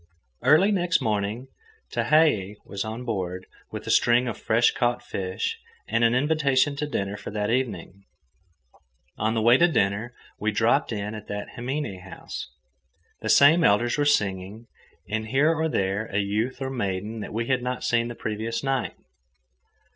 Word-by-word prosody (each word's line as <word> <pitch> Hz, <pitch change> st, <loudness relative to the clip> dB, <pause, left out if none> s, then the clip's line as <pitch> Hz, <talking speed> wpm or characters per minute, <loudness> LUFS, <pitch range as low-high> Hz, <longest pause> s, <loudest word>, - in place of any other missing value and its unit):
Early 155 Hz, -, +5 dB
next 180 Hz, -3 st, +2 dB
morning 105 Hz, +4 st, -2 dB, 0.4 s
Tehei 130 Hz, -11 st, +2 dB
was 100 Hz, 0 st, -4 dB
on 110 Hz, +3 st, -6 dB
board, 95 Hz, -5 st, -3 dB, 0.2 s
with -, -, -7 dB
a -, -, -1 dB
string 120 Hz, +1 st, +4 dB
of 120 Hz, -, -3 dB
fresh 115 Hz, +2 st, +2 dB
caught 120 Hz, 0 st, 0 dB
fish 95 Hz, -, -3 dB, 0.3 s
and 115 Hz, -, +1 dB
an 115 Hz, +1 st, +4 dB
invitation 140 Hz, 0 st, +2 dB
to 150 Hz, -, -2 dB
dinner 100 Hz, -6 st, -2 dB
for -, -, -8 dB
that 105 Hz, +1 st, -2 dB
evening. 100 Hz, -6 st, -3 dB, 1.1 s
On 110 Hz, +2 st, 0 dB
the 110 Hz, -, 0 dB
way 120 Hz, +2 st, +6 dB
to 175 Hz, -, +6 dB
dinner, 110 Hz, -, 0 dB, 0.2 s
we 110 Hz, +1 st, 0 dB
dropped 115 Hz, +7 st, +2 dB
in 105 Hz, -1 st, -3 dB
at 105 Hz, -1 st, -9 dB
the 105 Hz, 0 st, -4 dB
himine 130 Hz, -5 st, -4 dB
house. 95 Hz, 0 st, -8 dB, 0.7 s
The 110 Hz, -, -4 dB
same 160 Hz, +8 st, +6 dB
elders 120 Hz, +2 st, +3 dB
were -, -, +3 dB
singing, 100 Hz, -4 st, 0 dB, 0.4 s
with 110 Hz, +2 st, -2 dB
here 140 Hz, +8 st, +3 dB
or 160 Hz, 0 st, 0 dB
there 100 Hz, -3 st, -1 dB
a 100 Hz, -, -3 dB
youth 110 Hz, +7 st, -1 dB
or 130 Hz, -, -3 dB
maiden 105 Hz, -2 st, -3 dB
that 105 Hz, -, -6 dB
we 115 Hz, +2 st, -2 dB
had 130 Hz, 0 st, +1 dB
not 125 Hz, +1 st, -3 dB
seen 120 Hz, 0 st, +1 dB
the 120 Hz, -, -6 dB
previous 110 Hz, +3 st, -3 dB
night. 135 Hz, -2 st, -1 dB
115 Hz, 165 wpm, -25 LUFS, 105-130 Hz, 1.1 s, way